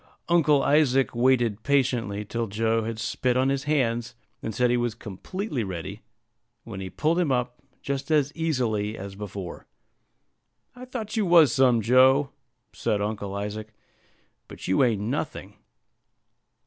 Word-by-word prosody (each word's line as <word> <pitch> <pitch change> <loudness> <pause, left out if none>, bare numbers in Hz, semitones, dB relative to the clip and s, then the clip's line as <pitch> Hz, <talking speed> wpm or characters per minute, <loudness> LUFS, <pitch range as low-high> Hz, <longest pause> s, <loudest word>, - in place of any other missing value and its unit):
Uncle 150 -5 +4
Isaac 140 -3 +3
waited 120 -3 +2
patiently 120 -7 0
till 115 +2 -3
Joe 110 +2 0
had 115 0 -4
spit 125 +3 -1
on 130 +1 +2
his 135 0 -1
hands, 120 -5 0 0.3
and 110 - -4
said 125 -1 +2
he - - +3
was 120 -2 -1
completely 125 - -5
ready, 90 -4 -6 0.6
when 95 - -8
he 95 -1 -5
pulled 160 - 0
him 165 -6 +1
up 125 -1 -1 0.2
just 140 0 -3
as 145 -3 +2
easily 120 -10 -1
as 100 0 -7
before. 100 -3 -8 1.1
"I 250 0 -9
thought 235 -4 -6
you 215 -4 +1
was 165 -8 +6
some, 125 -3 +4
Joe," 130 +4 +4 0.4
said 105 - -1
Uncle 100 -1 -3
Isaac; 105 +2 -5 0.7
"but - - -9
you 95 +9 +3
ain't 115 -5 +1
nothing." 115 -5 -4
120 Hz, 145 wpm, -25 LUFS, 105-140 Hz, 1.1 s, was